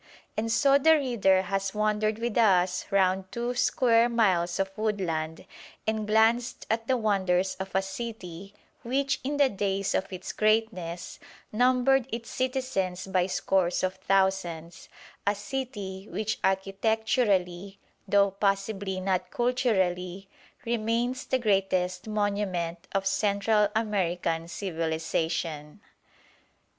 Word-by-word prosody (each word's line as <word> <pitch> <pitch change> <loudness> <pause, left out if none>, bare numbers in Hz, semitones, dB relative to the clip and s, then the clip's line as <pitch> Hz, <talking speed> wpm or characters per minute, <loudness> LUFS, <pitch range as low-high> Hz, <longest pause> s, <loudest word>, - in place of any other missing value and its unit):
And 225 +1 -1
so 275 +3 +4
the 320 +3 +6
reader 220 -10 +2
has 195 +1 -2
wandered 215 0 +1
with 235 -1 -3
us 185 -5 +3
round 190 -1 +1
two 240 +1 -2
square 240 -1 +3
miles 185 -7 +2
of 195 0 -2
woodland, 170 -7 -2 0.4
and 220 -1 -1
glanced 225 +3 +2
at 225 0 -1
the 260 - +2
wonders 190 -4 +1
of 190 0 -4
a 190 - +3
city 195 -2 -7 0.3
which 275 +3 0
in 285 +2 -2
the 285 -1 +5
days 195 -3 -1
of 195 - -1
its 185 0 -6
greatness 215 -6 -1 0.3
numbered 255 +2 +3
its 230 0 -5
citizens 255 -9 -2
by 185 -1 +1
scores 185 -2 0
of 185 0 +1
thousands; 190 -4 -1 0.4
a 205 - +3
city 205 -4 -5
which 215 0 -2
architecturally, 195 -1 0 0.3
though 200 0 +4
possibly 195 -1 -1
not 185 -1 -1
culturally, 195 -7 0 0.4
remains 235 +2 -1
the 260 - +2
greatest 190 -4 0
monument 200 -5 -2
of 195 0 0
Central 200 +2 +2
American 175 -6 -1
civilisation. 160 -2 -3
200 Hz, 115 wpm, -27 LUFS, 185-225 Hz, 0.4 s, the